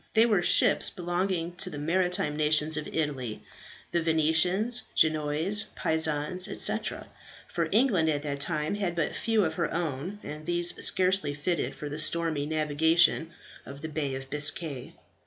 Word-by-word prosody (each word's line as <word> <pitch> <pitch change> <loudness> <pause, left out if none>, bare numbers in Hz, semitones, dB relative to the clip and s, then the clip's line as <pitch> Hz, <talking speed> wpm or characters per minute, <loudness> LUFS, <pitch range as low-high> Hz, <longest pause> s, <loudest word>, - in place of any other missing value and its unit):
They 225 +1 +6
were 210 -6 +2
ships - - +4
belonging 175 -1 -3
to 185 - +2
the 150 - -8
maritime 170 0 0
nations 150 0 +2
of 150 -1 -4
Italy 135 -8 -3 0.5
the 170 - 0
Venetians, 165 +9 +2
Genoese, 155 +6 +1
Pisans, 160 +3 +1
etc.; - - -3 0.4
for 165 -2 -3
England 205 -8 +2
at 145 -2 -1
that 140 -2 -4
time 150 +2 -1
had 195 -4 -2
but 165 -3 -2
few 225 -4 +1
of 160 - -2
her 170 0 -2
own, 165 +3 -4
and 150 +1 -9
these 175 0 +3
scarcely 185 -5 +3
fitted 155 +2 -2
for 150 - -7
the 145 +1 -6
stormy 155 -2 -1
navigation 160 +2 +2 0.3
of 140 +1 -11
the 160 - -4
Bay 145 -3 -3
of 135 0 -7
Biscay. 145 -2 0
160 Hz, 155 wpm, -27 LUFS, 150-180 Hz, 0.5 s, They